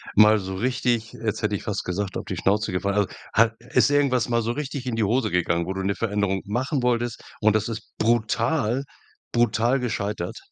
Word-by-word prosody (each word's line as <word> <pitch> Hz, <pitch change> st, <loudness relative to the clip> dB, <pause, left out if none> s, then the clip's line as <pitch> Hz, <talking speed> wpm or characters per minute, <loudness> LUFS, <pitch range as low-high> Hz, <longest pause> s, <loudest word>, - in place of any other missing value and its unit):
mal 105 Hz, +1 st, +7 dB
so 95 Hz, -1 st, -5 dB
richtig, 120 Hz, 0 st, 0 dB
jetzt 110 Hz, -1 st, -3 dB
hätte 105 Hz, -1 st, 0 dB
ich -, -, -5 dB
fast 105 Hz, -3 st, -2 dB
gesagt, 95 Hz, +2 st, -3 dB
auf -, -, -5 dB
die -, -, -4 dB
Schnauze 105 Hz, +2 st, +1 dB
gefallen, 100 Hz, +2 st, -1 dB
also 100 Hz, -, +2 dB, 0.3 s
ha 115 Hz, 0 st, +5 dB, 0.2 s
ist -, -, +4 dB
irgendwas 140 Hz, -4 st, +2 dB
mal 115 Hz, -1 st, +2 dB
so 115 Hz, -, -1 dB
richtig 140 Hz, 0 st, -4 dB
in 125 Hz, -, -2 dB
die 115 Hz, -, +1 dB
Hose 110 Hz, +2 st, +1 dB
gegangen, 85 Hz, -1 st, +1 dB
wo 95 Hz, -, -3 dB
du 95 Hz, -, -3 dB
'ne 100 Hz, +1 st, 0 dB
Veränderung 100 Hz, -3 st, 0 dB
machen 130 Hz, +6 st, -1 dB
wolltest 120 Hz, -1 st, 0 dB, 0.2 s
und 110 Hz, 0 st, +4 dB
das 110 Hz, -1 st, +1 dB
ist 115 Hz, -1 st, -7 dB
brutal, 115 Hz, +3 st, +1 dB, 0.5 s
brutal 120 Hz, +2 st, +2 dB
gescheitert? 105 Hz, -7 st, -3 dB
110 Hz, 200 wpm, -24 LUFS, 100-120 Hz, 0.5 s, mal